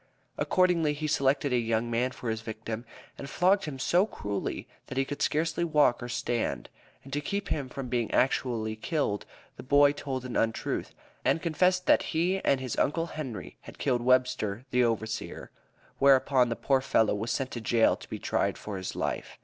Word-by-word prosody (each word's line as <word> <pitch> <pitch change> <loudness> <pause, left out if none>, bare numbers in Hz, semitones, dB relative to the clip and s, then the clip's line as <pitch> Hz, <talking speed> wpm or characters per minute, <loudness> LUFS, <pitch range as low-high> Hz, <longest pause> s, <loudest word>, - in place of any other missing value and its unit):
Accordingly, 175 -5 +2
he 150 +1 -4
selected 140 -2 +1
a - - +4
young 115 -1 0
slave 120 - -6
man 120 +2 +1
for 125 -2 -4
his 110 -1 -3
victim, 110 +1 -6 0.3
and 140 - -6
flogged 190 +6 +3
him 150 -4 -5
so 175 +9 +2
cruelly 105 - -4 0.2
that 130 - -7
he 135 - +2
could 145 - -6
scarcely 160 +2 +1
walk 150 -7 +3
or 120 - -5
stand, 120 -1 -2 0.3
and 135 - -11
to 145 - 0
keep 200 +7 -3 0.2
from 135 -1 -5
being 120 -2 -1
actually 120 -4 +1
killed, 110 -3 -2 0.3
the - - -7
boy 145 +2 +5
told 135 -3 -5
an 125 - -5
untruth, 115 0 -1 0.3
and 165 - +1
confessed 180 +2 +2
that - - +5 0.2
he 180 +4 +2
and 135 - +3
his 130 -3 -4
Uncle 165 +3 +1
Henry 135 -8 -6 0.2
killed 125 -4 0
Webster, 125 -3 +1
the 125 0 +3
overseer; 110 -1 -3 0.5
whereupon 135 -2 +5
the 115 - -1
poor 135 +1 +1
fellow 110 -4 +2
was 105 +3 -3
sent 135 +2 -1
to 120 - -5
jail 115 +1 +3
to - - -14
be - - -4
tried - - 0
for 105 -2 -6
his 95 - -5
life." - - -3
130 Hz, 185 wpm, -28 LUFS, 115-150 Hz, 0.5 s, boy